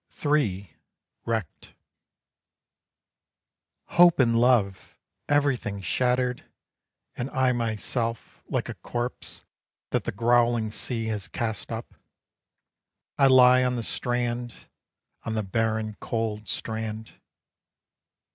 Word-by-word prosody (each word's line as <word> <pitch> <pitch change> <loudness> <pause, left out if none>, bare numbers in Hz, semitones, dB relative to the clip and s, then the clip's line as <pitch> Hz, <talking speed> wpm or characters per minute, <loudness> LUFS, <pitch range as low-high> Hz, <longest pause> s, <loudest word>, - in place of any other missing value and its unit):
III. 100 - 0 0.5
WRECKED. 110 -7 -4 2.1
Hope 175 -1 +5
and 115 -3 +4
love! 115 -5 +2 0.3
everything 140 -8 +1
shattered 125 +4 0 0.7
And 125 +2 -4
I 130 -2 +2
myself, 115 0 -3
like - - -1
a - - -4
corpse 120 +1 -5 0.5
That - - 0
the - - -1
growling 120 0 +2
sea 115 +1 -2
has 105 -1 -3
cast 110 -4 -4
up, - - -6 1.3
I 135 - +7
lie 130 -1 +7
on 125 0 +1
the 120 - -3
strand, 120 0 -3 0.6
On 110 - -3
the 110 - 0
barren 110 +1 -1
cold 110 -2 -3
strand. 110 0 -4
115 Hz, 100 wpm, -26 LUFS, 110-125 Hz, 2.1 s, I